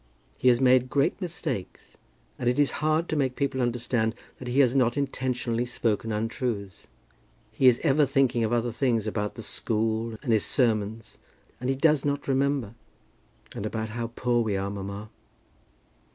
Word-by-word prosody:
He 130 - 0
has 120 -1 +6
made 130 -1 +4
great 140 +9 +1
mistakes, 160 - -5 0.4
and 120 - +1
it 125 - 0
is 145 -1 +3
hard 155 +2 +1
to - - -2
make 135 -4 0
people 135 -2 -1
understand 120 -2 0 0.2
that 125 - -7
he 125 +3 +1
has 125 -1 +3
not 125 -1 +2
intentionally 125 -4 -1
spoken 115 -2 -1
untruths. 105 -3 -3 0.6
He 130 +4 +3
is 125 -1 +6
ever 145 -2 +4
thinking 135 -4 +2
of 110 - 0
other 120 0 +1
things, 115 -3 0
about 105 -1 -2
the 115 - -7
school, 110 +1 -1
and 120 -5 +1
his 110 - +3
sermons, 110 -3 0 0.4
and 125 - -2
he 135 - +2
does 150 +1 +3
not 145 0 -2
remember." 135 -4 0 0.8
"And - - -4
about 110 +1 -3
how 115 +1 -3
poor 120 -1 +1
we 105 -4 0
are, 100 +1 -2
mamma." 100 +1 -6
120 Hz, 165 wpm, -27 LUFS, 110-135 Hz, 0.8 s, has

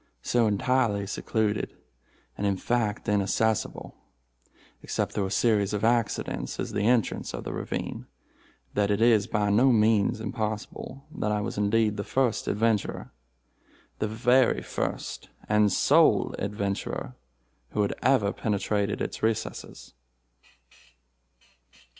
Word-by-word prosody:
So 120 -2 +2
entirely 105 -1 +1
secluded, 105 +1 -1 0.6
and 100 - -1
in 100 -1 +1
fact 110 -1 -1
inaccessible, 105 +1 0 0.9
except - - -2
through 100 -2 -1
a - - -6
series 105 -1 +2
of 105 - -2
accidents, 115 -1 0
is - - -3
the 105 +1 0
entrance 120 -3 +1
of - - -6
the - - -5
ravine, - - -4 0.7
that 100 -1 +1
it 100 0 +1
is 115 -2 +4
by 105 -3 0
no 125 +6 +5
means 110 -2 +3
impossible 110 +5 -5
that 105 - -1
I 105 - +1
was 105 - -4
indeed 105 +1 +2
the 100 - -2
first 125 -4 0
adventurer—the 65 - -4
very 125 +3 +3
first - - -4 0.2
and 105 -1 +3
sole - - +4
adventurer 100 -9 -3 0.6
who 105 - +2
had 100 - 0
ever 110 -7 +3
penetrated 100 -1 -1
its - - -4
recesses. 110 0 -3
105 Hz, 120 wpm, -27 LUFS, 100-115 Hz, 0.9 s, no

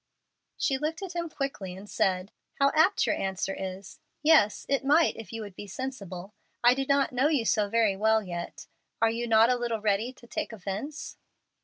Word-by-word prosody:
She 270 -2 0
looked 320 +6 -3
at 380 -2 -6
him 340 -1 -2
quickly 260 -12 -4
and 195 +2 -11
said, 190 -2 0 0.2
"How 275 0 +3
apt 315 +5 +4
your - - +2
answer 190 0 -2
is! 190 0 -7 0.2
Yes, 300 -10 +4
it 275 0 +1
might 300 +4 +4
if 225 - -9
you 225 -1 -5
would 205 -2 -9
be 205 - -8
sensible. 200 -5 -6 0.3
I 240 +1 +7
do 270 +1 -2
not 280 -1 +3
know 260 +3 +2
you 290 -7 +1
so 210 -1 +2
very 220 -3 +2
well 220 +2 +3
yet. 175 -2 -6 0.3
Are 225 0 +3
you 235 +1 -3
not 225 +1 +5
a - - +3
little 235 -2 -2
ready 210 +3 0
to 255 - -18
take 235 - -4
offence?" 220 - -6
225 Hz, 195 wpm, -28 LUFS, 200-275 Hz, 0.3 s, I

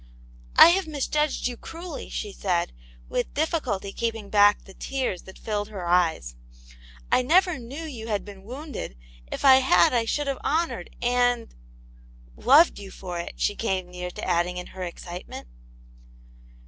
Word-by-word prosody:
"I - - +10
have 370 0 +2
misjudged 300 0 -1
you 245 - -1
cruelly," 330 +1 -8
she 205 - -4
said, 180 - -1 0.3
with 245 - -3
difficulty 260 - -1
keeping 225 -3 -3
back 205 0 +5
the 195 - -14
tears 255 -6 -3
that 190 - -12
filled 205 -2 -3
her 200 -4 -7
eyes. 165 - +1 0.4
" - - -22
I - - +5
never 350 +4 +3
knew 265 +7 -7
you 245 -8 -7
had 210 -3 -2
been 200 -2 -11
wounded; 250 - -7 0.3
if - - -3
I 265 -1 +9
had 180 -10 +4
I 235 -2 +2
should 290 +6 -1
have 275 -1 -2
honoured 315 - -1
and 245 -1 +1 0.3
— - - -24
" - - -24 0.2
loved 285 +4 +5
you 200 -1 -9
for 180 -2 -6
it, 170 - -5
she - - 0
came 190 -5 -2
near 180 0 -5
adding 180 0 0
in 180 - -6
her 190 - -8
excitement. 175 - -7
215 Hz, 165 wpm, -25 LUFS, 180-270 Hz, 0.4 s, I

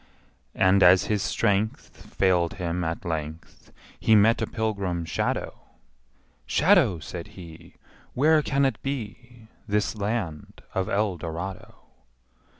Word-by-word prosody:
And, 95 +1 +4
as 90 +1 +7
his 105 -2 -1
strength 105 0 -1
Failed 90 -3 +2
him 90 -1 -3
at 85 +4 -4
length, 80 -1 -6 0.3
He 110 - +4
met 110 +2 +4
a - - -1
pilgrim 100 -7 -2
shadow: 80 - -2 0.9
``Shadow,'' 135 - +3
says 85 0 -7
he, 85 -4 -13 0.4
``Where 155 +3 +4
can 140 -1 +1
it 135 - -1
be, 120 -3 -7 0.2
This 105 +1 0
land 100 -7 -4
of 95 +2 -1
Eldorado?'' 95 -3 -3
100 Hz, 115 wpm, -25 LUFS, 85-110 Hz, 0.9 s, as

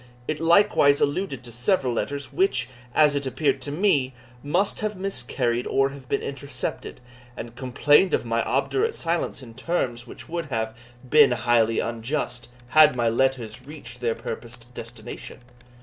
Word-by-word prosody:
It 155 - -2
likewise 165 -4 +4
alluded 145 -3 -1
to 120 - -10
several 125 - +1
letters, 140 +3 -3
which, 130 -11 +1 0.3
as 150 -2 +5
it 140 -1 -1
appeared 140 0 0
to 145 - -4
me, 145 -7 +1 0.3
must 175 +9 +1
have 215 -1 -2
miscarried 130 -11 -1
or 135 0 +2
have 135 -2 -12
been - - 0
intercepted, 140 +1 -5 0.4
and 115 0 -7
complained 145 +8 +3
of - - -3
my 115 0 0
obdurate 400 - 0
silence, 165 -4 -1
in 115 -2 -11
terms 120 -5 -2
which - - -11
would 170 0 -3
have, 110 -5 -3 0.3
been 150 0 +6
highly 115 -1 +2
unjust, 120 +1 -3 0.2
had 155 +1 +6
my 120 -2 +2
letters 125 -1 0
reached 125 -5 -9
their 115 -2 0
purposed 120 +1 -8
destination. 115 -2 -9
135 Hz, 150 wpm, -24 LUFS, 120-155 Hz, 0.4 s, been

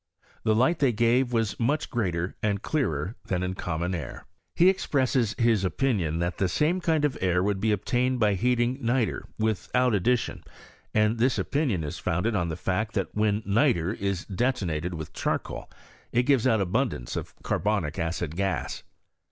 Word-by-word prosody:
The 110 - +2
lig'ht 130 +9 +3
they 135 -3 +4
gave 120 +3 +2
was 115 -3 0
much 140 +6 0
greater 90 -6 -1
and 100 -2 0
clearer 95 - -1
than 90 -2 -1
in 90 0 -1
common 85 0 -2
air. 80 -7 -6 0.2
* - - -51
He 175 - +5
expresses 130 - +1
his 115 -4 +3
opinion 95 - 0
that 85 +1 -2
the 95 - +2
same 160 - +1
kind 160 -3 +2
of 145 - -1
air 90 -1 +2
would 100 -1 0
be 110 +1 +2
obtained 125 +5 0
by 105 -3 +3
heating 120 +5 +1
nitre 120 -1 0
without 110 +3 +1
ad 100 -4 +1
dition, 125 -1 +1 0.5
and 110 +1 +2
this 125 +2 +2
opinion 130 - 0
is 75 - -5
founded 90 +8 0
on 85 -4 0
the 80 - -3
fact 105 +4 -2
that 95 -3 -1
when 105 0 +1
nitre 100 - +2
is 100 -2 -2
detonated 90 -7 -1
with 80 -2 -7
charcoal - - -3 0.4
it 125 - +3
gives 130 -2 +3
out 110 -4 +3
abundance 95 - -1
of - - -5
carbonic 100 -8 -1
acid 80 -1 -2
gas. 95 -2 -2
110 Hz, 175 wpm, -27 LUFS, 90-125 Hz, 0.5 s, He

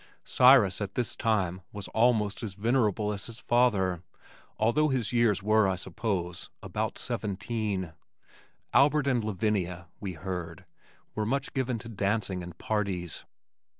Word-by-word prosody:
Cyrus 125 -7 +5
at 100 -1 -4
this 120 -3 0
time 95 -5 0
was 100 -2 -7
almost 110 -3 +2
as 105 -5 -5
venerable 110 -2 +1
as 100 - -6
his 115 -1 -9
father, 105 -9 +2 0.6
although 120 +8 +3
his 125 -4 -1
years 115 -5 +3
were, 110 0 +4
I 95 - +1
suppose, 90 -1 -3
about - - -3
seventeen. 100 -3 -3 0.8
Albert 145 +3 +4
and 125 -5 +1
Lavinia, 95 -5 -1
we 100 -3 -4
heard, 90 0 -6 0.5
were 105 -1 -2
much 135 +3 -1
given 130 -3 -1
to 110 - -9
dancing 100 -3 -1
and 85 -1 -9
parties. 95 -6 -2
105 Hz, 135 wpm, -29 LUFS, 95-115 Hz, 0.8 s, Cyrus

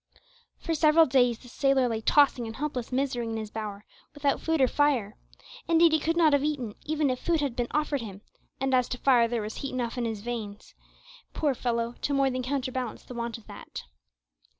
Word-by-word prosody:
For 330 - -3
several 315 +1 +5
days 245 -3 +3
the 250 - -16
sailor 270 0 +2
lay 225 -2 -2
tossing 265 -2 +3
in 225 - -7
helpless 265 -4 -4
misery 255 -3 -1
in 225 - -3
his 215 -1 -6
bower, 210 -1 -6 0.3
without 285 -1 0
food 325 -1 0
or 260 - +5
fire. 255 -8 +1 0.5
Indeed 335 0 +5
he 315 - +3
could 330 +3 -1
not 320 -3 +5
have 285 -1 +3
eaten 275 -8 -2
even 305 -3 0
if 255 - -3
food 335 -2 +1
had 280 -5 -2
been 245 -1 -1
offered 300 -2 0
him, 200 -3 -8 0.4
and 270 0 0
as 250 -1 +3
to 250 - -3
fire, 245 -3 +4
there 230 -2 -2
was 215 +1 -6
heat 275 - -5
enough 245 0 -2
in 240 - -1
his 220 -3 -3
veins, 215 -3 -6 0.6
poor 295 -3 +1
fellow! 235 -1 -2
to 285 - 0
more 275 -1 +2
than 255 0 -2
counterbalance 255 -2 -3
the - - -10
want 235 0 -4
of 225 - -18
that. - - -9
255 Hz, 210 wpm, -27 LUFS, 235-285 Hz, 0.6 s, several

